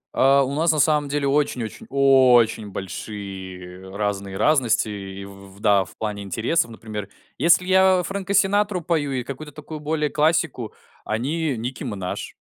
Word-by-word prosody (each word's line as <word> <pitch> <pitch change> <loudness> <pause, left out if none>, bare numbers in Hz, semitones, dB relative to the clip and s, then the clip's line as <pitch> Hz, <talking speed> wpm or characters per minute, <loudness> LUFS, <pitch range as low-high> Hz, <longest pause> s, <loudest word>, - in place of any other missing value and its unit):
А, 135 +1 +5
у 135 +1 -3
нас 160 +3 +2
на 155 - -1
самом 150 -1 +2
деле 145 -1 0
очень 140 -4 +1
очень 110 - -8
очень 130 -6 +4
большие 95 -2 -7
разные 100 -2 -3
разности 130 -8 +2
и 100 -1 -7
в 100 0 -14
да, 100 -3 +3
в - - -17
плане 105 -2 -4
интересов. 115 - 0
Например, 105 -2 -7 0.3
если 170 +5 +4
я 190 -1 +4
Фрэнка 195 0 -3
Синатру 205 -1 +2
пою 155 -4 -1
и 125 -2 -2
какую-то 150 +3 -8
такую 155 0 -8
более 150 0 -1
классику, 155 -6 +1 0.3
они- 140 +5 -1
некий 125 +3 -5
"Мэнаж". 95 -3 -5
130 Hz, 155 wpm, -23 LUFS, 100-155 Hz, 0.3 s, А